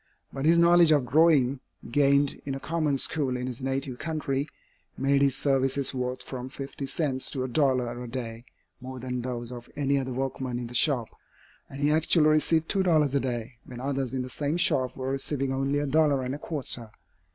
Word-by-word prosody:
But 135 - -3
his 165 +2 +5
knowledge 170 -1 +6
of 145 -5 +3
drawing, 145 -4 +4 0.3
gained 140 +1 +3
in 135 -1 -4
a - - -5
common 155 -2 -1
school 135 -2 0
in 125 - -4
his 125 0 -5
native 135 -1 -3
country, 150 -3 -2 0.5
made 140 +1 +2
his 140 -1 +3
services 135 0 +2
worth 125 0 -3
from 130 -1 -6
fifty 135 0 -6
cents 135 -3 -1
to 130 -3 -3
a - - -2
dollar 125 -3 0
a - - -7
day 115 -1 -6 0.3
more 130 0 -8
than 125 0 -4
those 120 -1 -4
of 120 -1 -9
any 140 -1 +1
other 130 -1 -4
workman 130 -1 -3
in 120 - -4
the 120 - -9
shop, 120 -2 +2 0.6
and 135 - -9
he 145 +1 +3
actually 155 0 +4
received 160 +1 +2
two 195 - +1
dollars 155 -6 +2
a 140 - +3
day, 120 -1 -4
when 125 -1 -10
others 135 -1 -2
in 130 - -1
the 125 - -7
same 150 +5 -2
shop 130 -7 +1
were 130 0 -3
receiving 135 0 -2
only 135 +2 0
a 145 - 0
dollar 145 -2 +2
and 130 +1 -3
a 145 - -5
quarter. 130 -7 -3
135 Hz, 200 wpm, -27 LUFS, 125-145 Hz, 0.6 s, knowledge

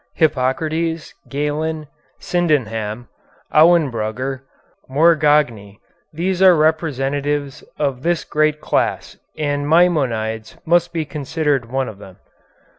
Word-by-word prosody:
Hippocrates, 155 +2 0 0.2
Galen, 150 +2 -2 0.3
Sydenham, 120 -10 -1 0.5
Auenbrugger, 135 -6 +2 0.5
Morgagni, 145 -9 +2 0.3
these 180 +4 -2
are 185 -2 +7
representatives 145 -3 -1
of 140 -4 -1
this 170 +2 0
great 155 0 0
class, - - -1 0.2
and 145 -1 -2
Maimonides 125 -11 +1
must 175 +1 +2
be 160 -2 -2
considered 145 -4 -2
one 135 0 -1
of 100 - -9
them. 95 -3 -13
150 Hz, 95 wpm, -19 LUFS, 130-160 Hz, 0.5 s, are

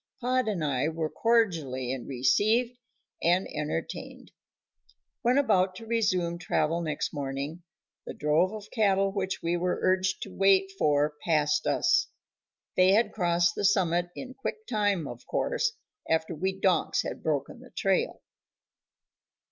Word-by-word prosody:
Pod 255 -1 0
and 195 -7 -1
I 140 0 0
were 160 -1 -3
cordially 155 - +1
received 210 - +1 0.5
and 175 +3 +2
entertained. - - -5 0.9
When 250 0 +3
about 190 -9 +2
to 225 - -9
resume 185 -7 0
travel 170 -1 0
next 155 -3 -3
morning 140 +3 -4 0.5
the - - -6
drove 155 +5 +2
of 215 -1 -9
cattle 195 -3 +2
which 190 -1 -3
we 170 +1 0
were 180 +1 0
urged 185 0 +1
to 195 - -9
wait 195 0 +4
for 150 0 +2
passed 150 -3 +1
us. 340 0 +2 0.7
They 185 +1 +5
had 225 +3 +3
crossed 170 -3 +2
the - - -4
summit 175 -3 +2
in 260 -1 -7
quick 435 +11 -5
time, 205 - 0
of 120 -2 -10
course, 485 -2 0 0.4
after 160 +1 +1
we 190 +4 -2
donks 190 -2 +2
had - - -6
broken 150 -4 -2
the - - -14
trail. - - -1
185 Hz, 140 wpm, -28 LUFS, 160-210 Hz, 0.9 s, They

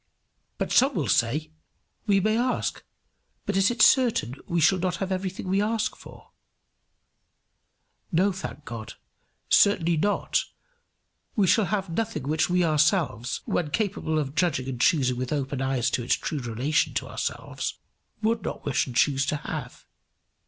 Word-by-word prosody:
But - - -2
some 270 +2 +4
will 145 -7 -1
say, 130 +10 +1 0.6
"We 200 -1 +4
may 215 +3 +1
ask, 245 +2 -1 0.6
but 205 - -2
it 195 +1 +4
is 235 -3 +5
certain 235 - +3
we 170 - 0
shall 185 +4 +4
not 180 0 -1
have 190 +1 -4
everything 190 0 -3
we 195 +2 +2
ask 220 +1 -1
for." - - -15 1.8
No, 190 +4 +3
thank 185 -5 -7
God, 115 -2 -7 0.5
certainly 170 -4 +4
not; 205 +6 +1 0.9
we 205 -5 +3
shall 200 +4 +4
have 195 0 -1
nothing 225 - -2
which 155 +3 0
we 180 0 +2
ourselves, 150 - +1
when 165 -4 -1
capable 185 -3 -1
of 140 -3 -2
judging 155 -7 0
and 125 -2 -4
choosing 135 -9 +3
with 125 0 -3
open 140 -2 -2
eyes 130 -2 0
to - - 0
its 120 - +2
true 150 - -4
relation 130 +4 0
to - - -1
ourselves, - - -4 0.5
would 225 0 +1
not - - -6
wish 140 -1 +1
and 125 - -8
choose 135 +2 +3
to 150 - 0
have. 145 -3 -6
165 Hz, 155 wpm, -26 LUFS, 135-195 Hz, 1.8 s, is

